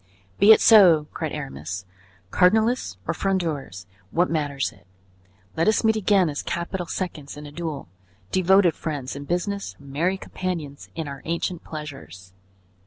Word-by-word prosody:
"Be 210 - +8
it 220 - +8
so," 180 -9 +7
cried - - -3
Aramis. 80 +8 -6 0.5
"Cardinalists 220 - +2
or - - +1
Frondeurs, 160 - -2 0.2
what 175 - +1
matters 145 -4 -1
it? 95 -2 -22 0.7
Let 165 - +1
us 215 - +3
meet 220 0 +3
again 200 -3 +3
as 145 -2 -3
capital 170 +1 -3
seconds 155 -7 -5
in 150 - -8
a 145 - -9
duel, 155 - -5 0.4
devoted 185 -1 +4
friends 145 -6 -5
in 140 0 -7
business, 195 +5 -2
merry 150 +7 -1
companions 170 -7 -5
in 160 -2 -4
our 140 -1 -7
ancient 170 +1 -2
pleasures." 95 - -9
165 Hz, 145 wpm, -24 LUFS, 140-185 Hz, 0.7 s, Be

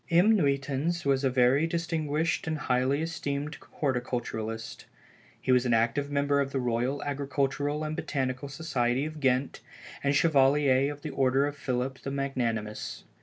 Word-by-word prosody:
M. 185 +6 +5
Nuytans 140 +1 0
was 135 0 +2
a 135 - +3
very 130 +5 +3
distinguished 165 -1 -1
and 160 -1 -1
highly 130 +2 +1
esteemed 150 -2 -3
horticulturist; 120 -4 -3 0.5
he - - 0
was 125 -1 +5
an 120 - +3
active 115 +5 +1
member 140 0 +2
of 135 0 -2
the 135 - -1
Royal 125 +3 -1
Agricultural 145 +1 -1
and 155 0 -3
Botanical 130 -1 -2
Society 135 -3 0
of 155 0 -6
Ghent 130 -1 +1 0.4
and 140 0 +2
Chevalier 140 -2 +4
of 145 +1 -10
the 155 - -4
Order 135 +1 +2
of 145 0 -3
Philip 130 -1 -2
the - - -5
Magnanimous. 120 -6 -3
140 Hz, 150 wpm, -28 LUFS, 130-145 Hz, 0.5 s, M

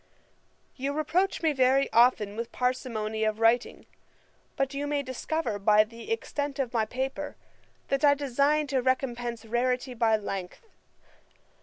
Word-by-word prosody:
] - - -41 0.3
'You 275 +2 -2
reproach 325 +6 0
me 315 -2 +3
very 265 +1 +3
often 230 -4 +4
with 230 +1 -5
parsimony 225 -4 -2
of 215 0 0
writing: 230 +2 +2 0.7
but 270 0 -1
you 285 +1 -3
may 290 -1 -1
discover 260 -3 -3
by 210 +1 +5
the 230 - -10
extent 290 -10 -3
of 260 -4 -2
my 225 -2 +2
paper, 265 +5 -4 0.5
that 275 +1 0
I 285 -1 +6
design 285 +2 +1
to 260 - +2
recompence 245 -2 -1
rarity 250 +3 -1
by 225 -2 +2
length. 195 - -6
255 Hz, 145 wpm, -28 LUFS, 230-280 Hz, 0.7 s, I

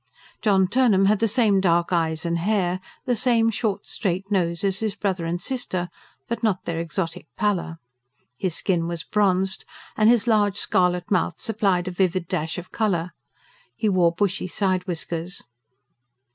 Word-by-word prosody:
John 195 -4 +3
Turnham 210 -3 +3
had 210 +1 +3
the 225 - +2
same 215 -4 +3
dark 175 -1 +2
eyes 160 -1 0
and 170 0 0
hair, 185 -1 0 0.3
the 245 - +1
same 230 -1 +3
short, 210 -2 -2
straight 195 -1 -3
nose 175 -2 0
as 195 -1 +1
his 220 -2 -1
brother 190 -5 -2
and 175 +1 -2
sister, 185 -5 -2 0.4
but 235 - -3
not 210 -5 0
their 165 -1 -2
exotic 165 0 -4
pallor. 190 -5 -1 0.6
His 180 +3 -2
skin 170 -4 0
was 170 -2 -4
bronzed; 190 -2 +1 0.3
and 215 0 +4
his 235 -3 +4
large, 205 -4 +2
scarlet 180 -2 +1
mouth 175 -3 +1
supplied 195 -5 0
a - - -2
vivid 185 -1 0
dash 160 0 -2
of 180 0 -8
colour. 180 -6 0 0.6
He 215 - 0
wore 180 -3 +3
bushy 190 +1 -1
side 185 0 -1
whiskers. 170 +1 -4
190 Hz, 160 wpm, -24 LUFS, 175-210 Hz, 0.6 s, and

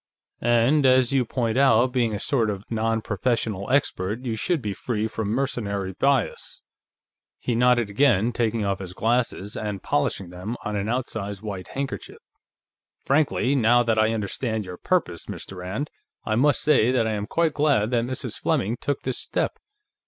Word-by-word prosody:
"And 120 +5 +3
as 130 -1 +4
you 130 -2 +3
point 115 0 -1
out, 130 -2 +4
being 120 -4 +1
a - - -4
sort 115 -1 +1
of 100 -1 -4
non 115 0 0
professional 105 -1 -1
expert, 120 -4 0
you 115 -3 -1
should 170 +8 0
be 105 -5 -3
free 110 +1 -2
from 110 -1 -4
mercenary 105 -6 -2
bias." 135 +1 0 0.7
He 120 - -2
nodded 120 -2 +3
again, 120 -1 +3
taking 115 -2 0
off 100 -1 -1
his 90 -2 -8
glasses 115 -3 0
and 105 -3 -4
polishing 85 +5 -1
them 95 +7 -5
on 105 -2 -2
an 100 +1 -2
outsize 110 -5 -3
white 100 -4 -5
handkerchief. 135 -1 -4 0.9
"Frankly, 140 -2 +2
now 120 -2 +4
that 115 -2 +1
I 110 +1 +3
understand 110 +1 -2
your 90 -1 -8
purpose, 125 - -1
Mr. 95 - -7
Rand, 95 +11 -4 0.3
I 110 - 0
must 135 +5 +3
say 125 -6 +4
that 125 -3 +2
I 110 - 0
am 105 -1 -3
quite 165 +1 +1
glad 140 -7 +2
that 120 -2 +2
Mrs. 130 +1 -4
Fleming 110 +5 0
took 145 -1 -2
this 130 - -2
step. - - -1
115 Hz, 170 wpm, -24 LUFS, 105-130 Hz, 0.9 s, as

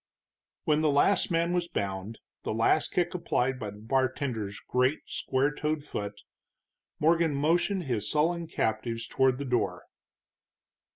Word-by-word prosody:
When 150 0 +2
the 155 - +3
last 145 +8 +3
man 170 0 +1
was 175 -1 0
bound, 100 - -3 0.2
the - - -3
last 115 +7 +2
kick 175 -1 0
applied 130 -7 0
by 105 - -4
the 100 - -10
bartender's 120 -3 -1
great, 130 +4 +2
square 135 +2 0
toed 150 0 -2
foot, 105 -7 -5 0.8
Morgan 165 -1 +3
motioned 175 +6 +1
his 120 -8 -1
sullen 165 +2 +1
captives 115 -2 -1
toward 130 -1 +2
the 140 - -4
door. 125 -2 0
135 Hz, 135 wpm, -29 LUFS, 115-160 Hz, 0.8 s, the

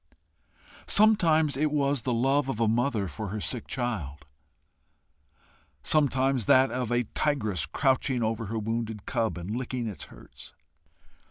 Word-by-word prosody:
Sometimes 165 -9 +4
it 150 +2 0
was 140 -3 +1
the 125 - -2
love 135 +4 +1
of 115 - -3
a 115 - +2
mother 115 -2 0
for 105 +7 -6
her 105 +3 -4
sick 115 +2 -3
child; 85 - -4 1.6
sometimes 135 -5 +2
that 130 -1 +5
of 125 -2 -3
a 120 0 +2
tigress 110 - 0
crouching 130 - +1
over 110 0 -2
her 115 +3 -3
wounded 110 -1 -3
cub 115 -6 -1
and 90 +5 -5
licking 125 -1 -3
its 105 -4 -6
hurts. - - -11
120 Hz, 140 wpm, -27 LUFS, 110-135 Hz, 1.6 s, that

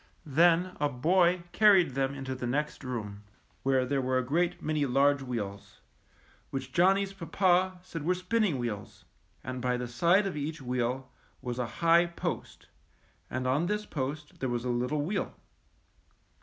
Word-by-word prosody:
Then 170 +5 +3
a 145 0 +2
boy 170 +6 +2
carried 195 -8 +5
them 135 +1 -1
into 135 -1 -4
the 125 -1 -4
next 145 +4 -2
room, 105 -6 -5 0.4
where 130 -1 +2
there 135 +1 0
were 130 0 +1
a 130 - +1
great 170 +6 0
many 155 -1 -1
large 140 +1 +3
wheels, 105 -6 -5 0.7
which 135 -1 -5
Johnny's 195 +2 +3
papa 185 +1 +1
said 165 -3 -6
were 180 +5 +1
spinning 185 -2 0
wheels; 110 -5 -5 0.4
and 130 -1 -5
by 125 0 0
the 125 0 -4
side 170 - +3
of 195 - -3
each 150 +2 -4
wheel 125 0 -2 0.3
was 125 0 -5
a 125 - -1 0.2
high 170 +1 +6
post, 170 - -5 0.6
and 130 +1 -3
on 140 +7 +1
this 210 +2 -1
post 145 0 -5
there 130 - -1
was 120 0 -2
a - - -1
little 125 +5 0
wheel. 190 +8 -2
140 Hz, 160 wpm, -29 LUFS, 125-175 Hz, 0.7 s, high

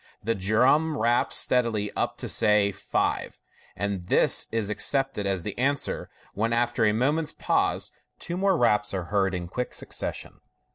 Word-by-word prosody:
The 115 +3 0
drum 125 +11 +2
raps 120 0 +1
steadily 115 -5 +1
up - - -2
to - - -4
(say) 105 -1 +3
five, - - -2 0.4
and 100 -2 -3
this - - +3
is 110 -2 -1
accepted 135 -3 0
as 95 -3 -1
the - - -5
answer, 140 +2 -1 0.2
when, 115 +3 -1
after 120 -1 +1
a 105 - +4
moment's 145 +8 0
pause, - - 0 0.3
two 175 - -6
more 190 0 +2
raps 105 -5 +2
are 95 - -2
heard 95 -2 +1
in 90 -1 -4
quick 125 +8 -4
succession. - - -6
110 Hz, 155 wpm, -26 LUFS, 100-130 Hz, 0.4 s, a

